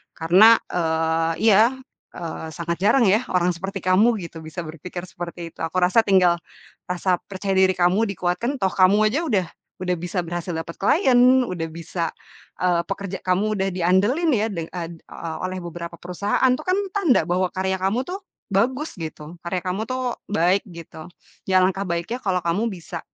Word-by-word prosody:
Karena, 190 +8 +6
eee, 165 -1 0 0.2
iya, 210 +1 +7 0.5
eee, 160 -1 -6
sangat 170 +1 -3
jarang 235 +3 +5
ya 215 +6 +3
orang 180 0 +3
seperti 195 +3 -5
kamu 210 +6 +4
gitu 165 -1 -8
bisa 175 +2 -6
berpikir 170 +3 -7
seperti 170 -1 -7
itu. - - -28
Aku 165 - -4
rasa 180 +6 +5
tinggal 180 -3 +4 0.5
rasa 180 0 +1
percaya 195 0 -3
diri 190 0 +5
kamu 180 +5 +3
dikuatkan 185 +10 -1
toh 190 - +3
kamu 200 +3 +4
aja 305 +6 0
udah 195 - +1 0.3
udah 180 -1 0
bisa 180 +1 -2
berhasil 175 +1 -4
dapat 165 +1 -5
klien, 255 - +5
udah 175 -5 -3
bisa, 170 +1 -4 0.5
eee, 175 -2 +2
pekerja 195 -1 -4
kamu 200 +3 +1
udah 190 - +1
diandelin 195 - +2
ya 215 -1 +2
de 165 -4 -4
eee, 170 -2 -5 0.2
o 160 -1 -6
oleh 185 0 -5
beberapa 170 0 -7
perusahaan 200 +7 -1
itu 255 - -3
kan 370 +1 +2 0.2
tanda 325 - +3
bahwa 180 +1 +1
karya 190 0 -1
kamu 205 +7 +1
tuh 380 +2 -4 0.3
bagus 260 +10 0
gitu, 160 +1 -7
karya 180 +2 -1
kamu 185 +4 -2
tuh 255 -1 -2
baik 190 -1 +2
gitu. 165 -1 -10 0.4
Ya 185 0 +5
langkah 190 +1 -1
baiknya 170 +9 -3
kalau 185 -2 +1
kamu 205 +8 +1
bisa, 170 -1 -7
185 Hz, 170 wpm, -23 LUFS, 170-210 Hz, 0.5 s, iya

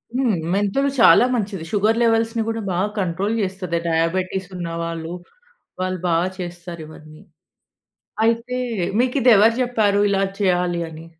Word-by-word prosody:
హ్మ్. 250 -7 +2 0.2
మెంతులు 205 +8 +1
చాలా 235 - +7
మంచిది. 195 -6 -3
షుగర్ 215 +2 +2
లెవెల్స్‌ని 225 0 +1
కూడా 225 0 -3
బాగా 190 +4 0
కంట్రోల్ 190 +4 -1
చేస్తది. 185 -3 -3
డయాబిటిస్ 180 +3 -1
ఉన్నవాళ్ళు, 165 -1 -4 0.7
వాళ్ళు 185 -1 -2
బాగా 170 +2 +2
చేస్తారు 175 -1 -7
ఇవన్నీ. 155 0 -14 1.0
అయితే 230 +2 0 0.4
మీకు 255 +2 -1
ఇది 245 0 +6
ఎవరు 225 +3 +5
చెప్పారు 215 -5 +1
ఇలా 195 -1 +1 0.2
చేయాలి 180 -3 +1
అని? 160 +1 -11
190 Hz, 130 wpm, -21 LUFS, 170-225 Hz, 1.0 s, చాలా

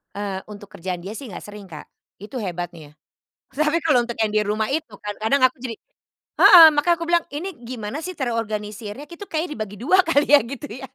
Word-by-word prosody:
Eee, 200 -2 -4
untuk 205 -1 -11
kerjaan 180 0 -5
dia 200 +5 -7
sih 280 - -8
nggak 210 - -8
sering 210 -1 -10
Kak, 160 -5 -11 0.3
itu 220 +6 -7
hebatnya, 175 -6 -6 0.6
tapi 305 +3 +1
kalau 300 -7 +3
untuk 235 -1 -6
yang 215 -1 0
di 215 - +3
rumah 210 +1 -1
itu 310 +3 -3
kadang-kadang 220 +6 -1
aku 255 - -5
jadi 235 -3 -5 0.6
heeh, 335 -3 +11
makanya 340 +4 +3
aku - - -2
bilang, 345 -1 +3
"Ini 305 +7 -5 0.2
gimana 245 +3 -5
sih 370 - -4
terorganisirnya? 215 -1 -4
Itu 350 +4 -10
kayaknya 320 0 -2
dibagi 210 -1 -6
2 355 +10 +4
kali 295 -3 +2
ya 290 - +9
gitu 275 +3 -8 0.2
ya. - - -8
230 Hz, 195 wpm, -22 LUFS, 205-290 Hz, 0.6 s, heeh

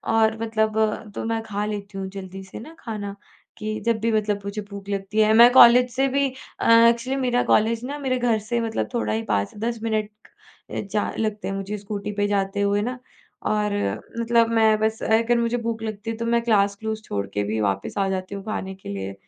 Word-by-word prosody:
और 220 0 +3
मतलब 220 -1 0
तो - - -3
मैं 225 0 -1
खा 205 -1 -3
लेती 205 -1 -5
हूँ 190 0 -3
जल्दी 190 0 -8
से 190 - -10
ना 315 +9 -11
खाना 205 -3 -5 0.4
कि 215 0 -3
जब 230 -1 +2
भी 230 +1 0
मतलब 210 -2 0
मुझे 200 +1 -4
भूख 200 -1 -9
लगती 200 +1 -2
है। 215 0 +5
मैं 235 +2 +8
कॉलेज 250 0 +8
से 270 +1 +2
भी 275 +1 +1 0.3
अ, - - +3
एक्चुअली 235 +3 +5
मेरा 245 -1 +2
कॉलेज 225 +2 +2
ना 285 +3 -4
मेरे 260 -2 0
घर 240 -3 +1
से 230 +3 -2
मतलब 225 -1 -2
थोड़ा 235 - 0
ही 220 +1 -1
5-10 220 - -2
मिनट 215 -2 0 0.6
अ, - - -4
जा 205 +1 -2
लगते 215 -1 -2
हैं 195 - -2
मुझे 195 +2 -4
स्कूटी 205 0 -5
पे 205 0 +2
जाते 200 0 0
हुए 200 0 +2
ना 250 +3 -3 0.5
और 210 -1 +1 0.5
मतलब 230 0 +3
मैं 220 -1 +4
बस 220 0 0
अगर 230 +2 +3
मुझे 235 +1 +1
भूख 230 -1 -3
लगती 220 0 -5
है 225 - -6
तो 230 - -3
मैं 235 0 +2
क्लास 200 -3 +3
क्लूस 220 +1 -4
छोड़ 100 -1 -2
के 105 - 0
भी 110 +2 -2
वापस 100 - -2
आ 195 - +2
जाती 190 +1 -3
हूँ 195 - -7
खाने 190 -3 -4
के 190 - -11
लिए, 100 -1 -4
215 Hz, 215 wpm, -23 LUFS, 200-230 Hz, 0.6 s, मैं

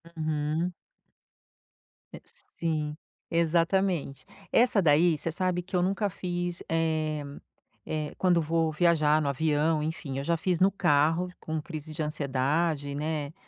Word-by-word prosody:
Uhum. 155 +2 -1 1.4
Eh, - - -9 0.4
sim. 155 -3 -1 0.3
Exatamente. 170 -2 +1 0.3
Essa 235 -4 +4
daí, 160 0 +4
você 165 - -3
sabe 180 +1 -1
que 185 +2 -7
eu 180 - +3
nunca 195 +3 0
fiz, 175 -2 -4
eh 155 -2 0 0.6
eh 155 -1 -3
quando 180 -2 +3
vou 165 0 +1
viajar 155 -2 +3
no 145 - -1
avião, 155 +2 +1
enfim, 150 -3 -4
eu 135 - -2
já 170 +3 +1
fiz 175 +1 0
no 190 +2 +5
carro 165 -1 +2
com 160 -1 -3
crise 155 -1 -7
de 155 - -4
ansiedade, 145 0 -1
né, 150 0 -3
160 Hz, 135 wpm, -28 LUFS, 150-175 Hz, 1.4 s, no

